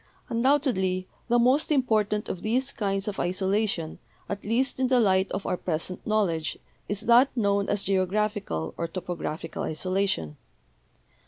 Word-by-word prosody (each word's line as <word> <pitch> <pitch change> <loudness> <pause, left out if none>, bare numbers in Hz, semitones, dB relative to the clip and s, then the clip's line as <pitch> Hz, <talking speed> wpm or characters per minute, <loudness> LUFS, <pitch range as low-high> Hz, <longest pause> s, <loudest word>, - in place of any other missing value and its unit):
Undoubtedly 230 -8 +1 0.2
the 240 0 +3
most 260 +7 +3
important 215 -6 +1
of 180 - -4
these 255 +5 0
kinds 195 -1 -2
of 205 - -3
isolation, 190 -2 -1 0.3
at 200 - -4
least 250 +6 0
in 260 - +2
the 255 -1 +4
light 190 -3 +3
of 195 +1 -3
our - - 0
present 175 +1 -3
knowledge, 185 -7 0 0.3
is 205 0 -2
that 240 +4 +6
known 200 -2 +1
as 205 -1 0
geographical 195 - 0
or 170 - -2
topographical 170 -2 -5
isolation. 170 - -1
200 Hz, 140 wpm, -27 LUFS, 185-230 Hz, 0.3 s, that